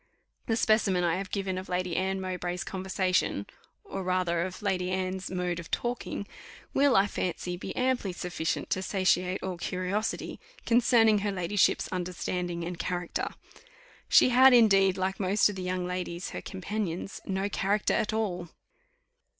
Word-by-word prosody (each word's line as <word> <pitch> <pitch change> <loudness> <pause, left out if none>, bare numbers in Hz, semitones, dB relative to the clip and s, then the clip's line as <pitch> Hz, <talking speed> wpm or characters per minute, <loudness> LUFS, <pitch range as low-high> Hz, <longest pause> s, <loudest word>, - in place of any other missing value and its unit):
The 225 - +2
specimen 215 -5 +3
I 170 0 +2
have 190 0 -4
given 190 -2 -2
of 185 - -9
Lady 180 -1 -1
Anne 190 +1 0
Mowbray's 180 -1 -3
conversation, 190 -1 0 0.4
or 195 - -5
rather 180 -2 0
of 185 +3 -5
Lady 185 -3 0
Anne's 185 0 -2
mode 180 -2 -2
of 170 - -9
talking, 240 -4 -3 0.5
will, 280 -1 +4
I 195 - +6
fancy, 180 -2 -3
be 175 - -6
amply 255 -6 0
sufficient 175 -2 -3
to 185 - +1
satiate 185 -1 +1
all 185 -2 -3
curiosity 185 +5 -2 0.3
concerning 230 -2 +4
her 205 0 -1
ladyship's 185 +1 +1
understanding 180 -1 -3
and 170 0 -5
character. 175 -1 -2 0.8
She - - +7
had, 255 +1 +7
indeed, 195 -5 +5
like 190 +1 -1
most 200 +2 +3
of 205 - -5
the 190 - -5
young 180 0 -2
ladies 180 0 -4
her - - -5
companions 190 -1 -4
"no 195 +1 -1
character 205 +1 0
at 215 - +1
all." 185 -6 -2
185 Hz, 150 wpm, -29 LUFS, 180-205 Hz, 0.8 s, She